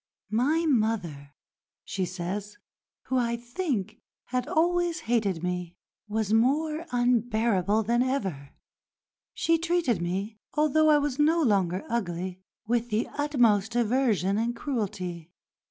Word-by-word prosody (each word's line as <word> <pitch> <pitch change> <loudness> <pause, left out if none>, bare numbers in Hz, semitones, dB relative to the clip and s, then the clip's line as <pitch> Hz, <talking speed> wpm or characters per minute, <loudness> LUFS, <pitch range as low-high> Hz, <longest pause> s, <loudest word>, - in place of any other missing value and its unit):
"My 290 +9 +2
mother," 200 - -1 0.5
she 190 -1 -2
says, 190 +4 -5 0.5
"who, 260 - -1
I 235 -1 +1
think, 240 - -3 0.3
had 250 0 -1
always 345 +1 +1
hated 205 -8 0
me, 180 -1 -3 0.3
was 215 0 -1
more 300 +7 +1
unbearable 225 -4 +2
than 235 +3 +2
ever. 195 - -2 0.9
She 330 0 +2
treated 330 - +1
me, 195 +5 -3 0.2
although 310 +1 +3
I 300 - +6
was 290 -2 -1
no 320 +3 +4
longer 190 - +1
ugly, 185 -5 -3 0.2
with 235 +1 0
the 220 +1 0
utmost 240 -7 +2
aversion 225 -5 +2
and 235 +1 -1
cruelty. 185 - -4
230 Hz, 120 wpm, -27 LUFS, 195-275 Hz, 0.9 s, I